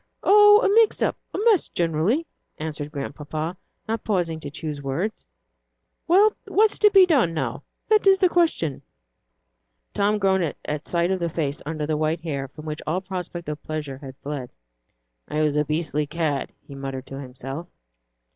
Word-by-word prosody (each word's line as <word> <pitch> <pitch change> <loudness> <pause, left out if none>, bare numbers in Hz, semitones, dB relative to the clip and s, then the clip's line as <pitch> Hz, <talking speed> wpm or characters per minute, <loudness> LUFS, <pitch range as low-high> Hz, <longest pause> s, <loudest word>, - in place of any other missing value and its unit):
"Oh, 415 +1 +7
a - - +4
mix 445 +1 +4
up; - - +1 0.2
a - - -4
mess 435 -7 +4
generally," 175 - 0 0.3
answered 150 -1 -5
Grandpapa, 155 +4 -4 0.3
not 225 0 -2
pausing 175 -6 -1
to 145 - -7
choose 150 -1 -5
words. 155 +11 -3 0.8
"Well, 405 +5 +5
what's 430 +1 +3
to 420 - +7
be 390 -2 +7
done, 260 - +2
now, 155 - -2 0.3
that 430 -2 +3
is 385 0 +7
the 375 - +4
question?" 325 - +1 1.1
Tom 205 +1 +2
groaned 190 -5 +1
at 150 0 -4
sight 170 +1 +1
of 190 - 0
the 170 -1 -1
face 150 -4 -2
under 155 -1 -2
the 155 0 -1
white 155 +2 0
hair, 140 -5 -3
from 150 +4 -12
which 155 -1 -5
all 165 +4 +1
prospect 180 -3 -6
of 150 0 -4
pleasure 150 -4 -5
had 135 -2 -10
fled. 140 -4 -4 0.8
"I 155 +1 0
was 150 -1 +1
a 150 - +3
beastly 150 -1 -1
cad," 155 -3 -2 0.2
he 140 - -10
muttered 135 -1 -5
to 135 - -8
himself. 135 +5 -7
160 Hz, 170 wpm, -24 LUFS, 145-205 Hz, 1.1 s, Oh